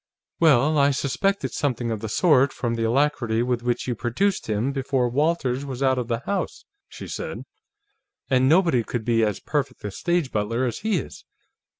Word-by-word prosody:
"Well, 150 -1 +4
I 140 0 +5
suspected 170 +9 -1
something 125 -5 -1
of 110 - -2
the 110 - -5
sort 140 - +4
from 120 -3 -3
the 115 -1 -1
alacrity 120 -2 +1
with 125 -1 -1
which 120 +1 -1
you 125 - 0
produced 125 - -1
him, 110 +5 0
before 135 -2 0
Walters 135 -1 0
was 135 -1 -4
out 130 -1 +2
of 120 - -3
the 115 -1 -2
house," 200 +8 -3 0.2
she - - -9
said. - - -5 0.8
"And 130 0 +3
nobody 165 -7 +4
could 115 0 -4
be 115 -1 +2
as 105 -3 0
perfect 140 -4 -3
a 105 - -4
stage 170 - -1
butler 115 +4 -1
as 120 - -3
he 215 -2 0
is. 145 - -7
130 Hz, 185 wpm, -24 LUFS, 120-145 Hz, 0.8 s, I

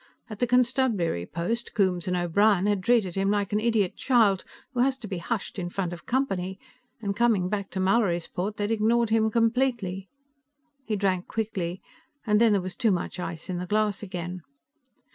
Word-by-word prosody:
At 215 - -7
the 245 - +2
constabulary 235 - +1
post, 225 +9 -3
Coombes 185 -4 +1
and 180 0 0
O'Brien 190 +3 +3
had 205 -2 +1
treated 210 -3 +2
him 195 +1 0
like 205 -1 0
an 210 - +3
idiot 220 -4 +1
child 220 -7 +3 0.3
who 250 - -3
has 260 +1 +3
to 230 - -8
be 190 -3 -4
hushed 205 +2 -3
in 175 -1 -3
front 175 -1 -3
of 170 - -11
company 195 -8 -1 0.4
and 200 -1 -1
coming 215 -6 +2
back 200 -1 -2
to 190 - -4
Mallorysport 190 0 0
they 205 - -1
had 205 - -1
ignored 225 +1 +2
him 220 0 +3
completely. 230 -5 0 0.8
He 220 - -1
drank 190 -3 0
quickly, 190 -5 -3 0.4
and 210 -1 +3
then 230 -2 +6
there 200 -2 +3
was 185 0 -6
too 235 -3 +2
much 180 -1 -1
ice 165 -2 -5
in 180 -2 -3
the 180 - -5
glass 210 0 +1
again. 180 -2 -5
200 Hz, 185 wpm, -26 LUFS, 180-225 Hz, 0.8 s, then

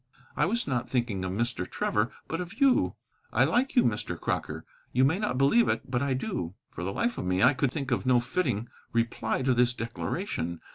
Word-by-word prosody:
"I - - +2
was 235 +5 +1
not 125 -2 -1
thinking 120 -7 -1
of 95 - -2
Mr. 115 -2 -2
Trevor, 105 +4 0 0.2
but 165 +2 -2
of 180 +6 -8
you. 275 -2 +4 0.4
I - - +4
like 260 +3 +1
you, 245 - +6
Mr. 105 -2 -1
Crocker. - - -3 0.3
You 130 +2 +4
may 160 +8 +2
not 210 -11 -1
believe 140 - +4
it, - - -2
but 125 -1 +1
I 140 -2 +1
do." 115 - -3 0.2
For 85 - -6
the 95 - -2
life 235 - -1
of - - -3
me 90 +2 +1
I 125 - +7
could 135 -1 0
think 135 -2 -4
of 120 - +1
no 125 -1 +4
fitting 120 - -1 0.3
reply 115 +1 0
to 130 0 +3
this 125 0 +3
declaration. 115 - -3
125 Hz, 210 wpm, -28 LUFS, 115-165 Hz, 0.4 s, I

